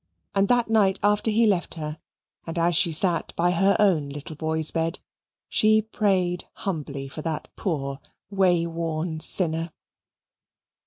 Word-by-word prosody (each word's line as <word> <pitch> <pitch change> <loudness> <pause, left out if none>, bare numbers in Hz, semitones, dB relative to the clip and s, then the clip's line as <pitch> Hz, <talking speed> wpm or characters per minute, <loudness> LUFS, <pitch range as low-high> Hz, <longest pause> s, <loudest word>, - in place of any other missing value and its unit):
And 195 0 +2
that 240 0 +2
night 210 -4 +2
after 210 +2 +2
he 225 +2 +3
left 190 -6 0
her, 155 -1 -6 0.5
and 165 - -5
as 170 0 +2
she 170 +2 +3
sat 170 +2 +2
by 175 +1 +2
her 195 +3 +3
own 175 -9 +2
little 145 +2 -8
boy's 160 0 0
bed, 165 +1 -1 0.5
she 215 0 +3
prayed 190 -5 0
humbly 145 -7 -5
for 145 +3 -8
that 160 -1 -4
poor 140 -7 -3 0.3
way 180 -4 +2
worn 165 -1 -3
sinner. 165 -1 +2
170 Hz, 145 wpm, -24 LUFS, 160-195 Hz, 0.5 s, he